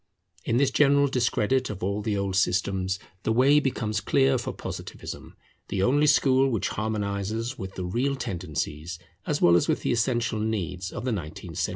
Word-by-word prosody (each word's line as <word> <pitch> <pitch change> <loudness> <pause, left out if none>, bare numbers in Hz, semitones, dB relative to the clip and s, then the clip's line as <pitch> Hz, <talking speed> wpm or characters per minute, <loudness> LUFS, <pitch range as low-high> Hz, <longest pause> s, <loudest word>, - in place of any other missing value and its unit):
In 115 - +1
this 135 0 +3
general 140 0 +4
discredit 130 0 +1
of 100 -3 -6
all 100 +2 -1
the 105 -1 -1
old 100 -1 -1
systems 95 0 +1 0.2
the 110 - -1
way 135 +6 +5
becomes 110 -7 -1
clear 135 -2 +3
for 120 - -4
Positivism, - - -8 0.3
the 95 - -1
only 145 +6 +3
school 135 -2 +4
which 110 -7 -1
harmonizes 110 +2 -2
with 95 0 -6
the 90 - -4
real 125 +10 0
tendencies 80 - -4 0.3
as 150 - 0
well 85 - +7
as 85 - +3
with - - 0
the - - 0
essential 120 -1 0
needs 95 -4 -2
of - - -6
the 130 - 0
nineteenth 85 -8 -5
century. - - +1
110 Hz, 180 wpm, -26 LUFS, 95-130 Hz, 0.3 s, well